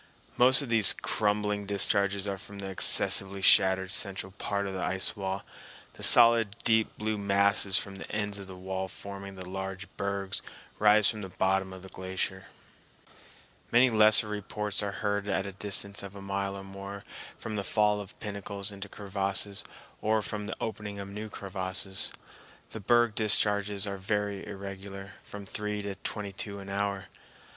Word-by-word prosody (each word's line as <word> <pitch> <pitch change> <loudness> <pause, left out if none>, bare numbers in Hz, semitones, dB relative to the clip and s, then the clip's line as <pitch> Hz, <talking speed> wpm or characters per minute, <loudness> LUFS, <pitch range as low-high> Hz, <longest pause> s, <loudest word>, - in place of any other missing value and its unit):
Most 130 +3 +6
of 135 - -7
these 115 -3 +5
crumbling 105 -1 0
discharges 100 0 +2
are 100 -1 -3
from 100 +1 -11
the 95 -1 -5
excessively 95 +1 +2
shattered 95 -1 +5
central 95 -1 -1
part 100 0 -3
of 95 - -4
the 95 - -3
ice 95 +3 +1
wall; 95 -1 -4 0.5
the - - -13
solid 115 -3 +7
deep 110 -1 +2
blue 110 0 -2
masses 100 -1 +4
from 100 -1 -4
the - - -9
ends 105 -1 -2
of 100 - -9
the 95 - -9
wall 95 +1 -4
forming 100 +1 -8
the 95 -1 -8
large 95 +1 -5
bergs 100 -1 -3 0.4
rise 105 -1 +6
from 110 -2 -1
the 95 - -6
bottom 95 +1 0
of 95 0 -10
the - - -9
glacier. 95 0 -4 1.3
Many 125 +1 +5
lesser 110 0 +6
reports 105 0 -4
are 100 -1 -2
heard 100 0 0
at 95 -1 0
a 100 - -5
distance 100 +1 0
of 100 0 -9
a - - -8
mile 100 0 -2
or 100 - -7
more 100 +1 -8 0.3
from 110 - -6
the 100 - -2
fall 105 0 +2
of 100 - -12
pinnacles 100 -1 -5
into 100 0 -8
crevasses 100 0 -1 0.4
or 110 0 +1
from 105 0 -4
the 110 - -5
opening 105 -2 -5
of 100 0 -7
new 105 +2 -6
crevasses. 95 -1 -2 0.6
The 110 - -6
berg 120 +2 +3
discharges 105 -1 +3
are 100 -1 -4
very 100 0 -2
irregular, 100 0 -8
from 100 -1 -10
three 105 +1 -4
to 100 -1 -4
twenty 100 +1 -5
two 100 +1 -4
an 100 0 -9
hour. 100 -1 -2
100 Hz, 170 wpm, -29 LUFS, 95-105 Hz, 1.3 s, solid